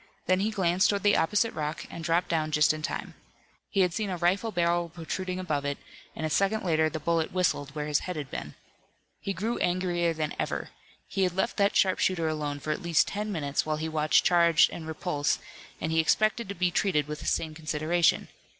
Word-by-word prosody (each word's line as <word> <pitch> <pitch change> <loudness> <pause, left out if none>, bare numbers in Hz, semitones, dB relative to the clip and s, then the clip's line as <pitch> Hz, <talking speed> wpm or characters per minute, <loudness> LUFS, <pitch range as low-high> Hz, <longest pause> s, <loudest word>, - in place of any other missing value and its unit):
Then 185 0 +2
he 205 +3 +1
glanced 190 -3 +2
toward 200 -2 0
the 205 0 +5
opposite 210 +6 +2
rock 150 +1 -4
and 170 - -7
dropped 170 +2 +1
down 155 -2 0
just 150 0 +4
in 155 - -6
time. - - -4 0.6
He 195 - +1
had 180 -2 +2
seen 210 +1 -2
a 180 - -2
rifle 190 +6 +1
barrel 170 -2 +1
protruding 180 +3 -4
above 150 -6 -2
it, 145 0 -2 0.4
and 160 - -3
a - - -1
second 200 +5 +1
later 160 -3 +2
the 155 - -5
bullet 165 +1 0
whistled 150 -6 0
where 150 -1 -2
his 150 -1 +1
head 180 - -5
had 145 -4 -6
been. 75 - -6 0.6
He 195 - -3
grew 220 +5 -2
angrier 175 -1 +1
than 155 -1 -2
ever. - - -3 0.4
He 195 - -2
had 180 -2 +1
left 230 +5 0
that 200 -1 +2
sharpshooter 185 -3 +2
alone 150 -2 -2
for 155 - -3
at 155 - -2
least 170 -3 +2
ten 210 +1 -3
minutes, 145 -6 -1
while 155 0 -1
he 160 +1 -3
watched 155 -1 +2
charge 170 -2 +5
and 160 -2 -7
repulse, 160 -2 -1 0.4
and 160 - -2
he 160 - +2
expected 215 +6 +2
to 200 - -4
be 180 0 +1
treated 160 -6 +1
with 150 0 -5
the - - -7
same 160 -1 0
consideration. 155 +1 +1
170 Hz, 215 wpm, -28 LUFS, 155-185 Hz, 0.6 s, the